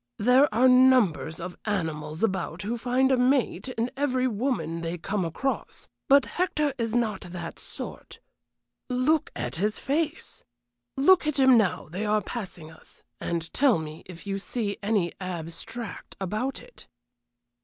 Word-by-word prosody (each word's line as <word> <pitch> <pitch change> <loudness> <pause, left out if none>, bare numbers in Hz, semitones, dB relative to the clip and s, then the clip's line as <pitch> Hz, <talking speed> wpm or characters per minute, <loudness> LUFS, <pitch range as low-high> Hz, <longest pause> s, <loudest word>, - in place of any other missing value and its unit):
There 255 +6 +5
are 240 +4 +4
numbers 250 -11 +4
of 180 +1 -7
animals 160 -5 -2
about 190 -4 -1
who 225 +4 -2
find 250 +3 +2
a 260 - +4
'mate' 260 +1 +1
in 240 0 -2
every 260 -2 +1
woman 205 - -1
they 165 +1 -3
come 195 +3 -2
across. 220 - -3 0.2
But 280 -2 +6
Hector 300 -5 0
is 230 0 -1
not 220 -5 0
that 175 -2 -7
sort. - - -7 0.7
Look 260 +5 +2
at 125 +3 -3
his 210 +4 0
face 310 +3 -2 0.5
look 310 +4 +5
at 305 - 0
him 265 -2 +6
now 210 -6 +2
they 180 +7 -4
are 215 0 +3
passing 180 -9 -6
us, 160 - -13 0.2
and 165 -1 -3
tell 270 -7 +4
me 155 0 -7
if 180 0 -11
you 195 0 -2
see 205 0 -2
any 200 -4 +1
abstract 180 +5 -6
about 215 +8 -3
it?" - - -15
215 Hz, 150 wpm, -27 LUFS, 175-260 Hz, 0.7 s, But